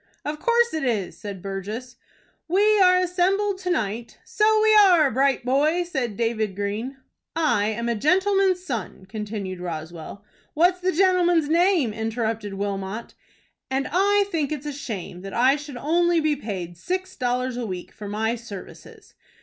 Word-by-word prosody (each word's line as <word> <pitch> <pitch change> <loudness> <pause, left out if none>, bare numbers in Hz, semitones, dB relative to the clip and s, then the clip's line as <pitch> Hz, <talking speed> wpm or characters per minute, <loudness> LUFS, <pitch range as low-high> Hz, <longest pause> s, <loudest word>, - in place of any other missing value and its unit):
"Of 300 +1 -3
course 475 +4 +2
it 315 - -2
is," 220 -8 -1
said 200 -3 -8
Burgess. 210 +6 -5 0.5
"We 415 +5 +4
are 365 -1 +6
assembled 370 +2 +1
to 365 -1 -4
night 230 - -2
" - - -35
"So 435 0 +3
we 435 0 +5
are. 355 -9 +6
Bright 265 0 +1
boy!" 300 +7 +2
said 265 - -3
David 220 -4 -1
Green. 210 +7 -3 0.4
"I 300 -11 +2
am 225 +2 -2
a 235 - +1
gentleman's 370 - +2
son," 220 - -5
continued 205 -2 -5
Roswell. 170 +3 -7 0.3
"What's 355 +4 +3
the 370 +1 +1
gentleman's 350 -4 +3
name?" 335 - +3
interrupted 220 -2 -3
Wilmot. 200 +2 -4 0.6
"And 265 +1 -1
I 400 +4 +3
think 310 -4 -1
it's 300 -1 -4
a 295 - -3
shame 210 -10 -6
that 195 0 -7
I 255 +4 +4
should 290 -3 -8
only 340 +5 +2
be 310 -1 +1
paid 185 -10 -6
six 370 - -3
dollars 250 -1 -1
a 240 -2 -3
week 180 -2 -6
for 210 - -9
my 220 +3 -1
services." 225 -5 -10
260 Hz, 160 wpm, -24 LUFS, 210-355 Hz, 0.6 s, are